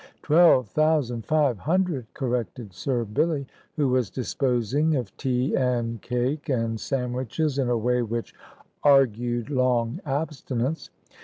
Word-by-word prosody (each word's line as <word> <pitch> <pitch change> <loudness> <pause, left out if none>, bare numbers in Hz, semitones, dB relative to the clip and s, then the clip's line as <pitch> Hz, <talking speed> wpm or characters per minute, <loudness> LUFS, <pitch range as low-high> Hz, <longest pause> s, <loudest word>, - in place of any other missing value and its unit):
"Twelve 155 -6 +5
thousand 145 -7 +1
five 145 -8 +2
hundred," 165 - 0
corrected 120 -5 -3
Sir 120 +5 -1
Billy, 140 +7 0 0.3
who 145 -3 +1
was 125 -5 +1
disposing 130 - 0
of 120 -7 -4
tea 130 -1 0
and 120 -4 0
cake 125 +5 -2
and 115 -4 0
sandwiches 130 +4 -2
in 130 -3 +1
a 120 - +2
way 125 +2 +1
which 115 0 -4 0.5
argued 120 -3 +3
long 125 -3 +1
abstinence. 140 -1 -3
125 Hz, 125 wpm, -25 LUFS, 120-145 Hz, 0.5 s, Twelve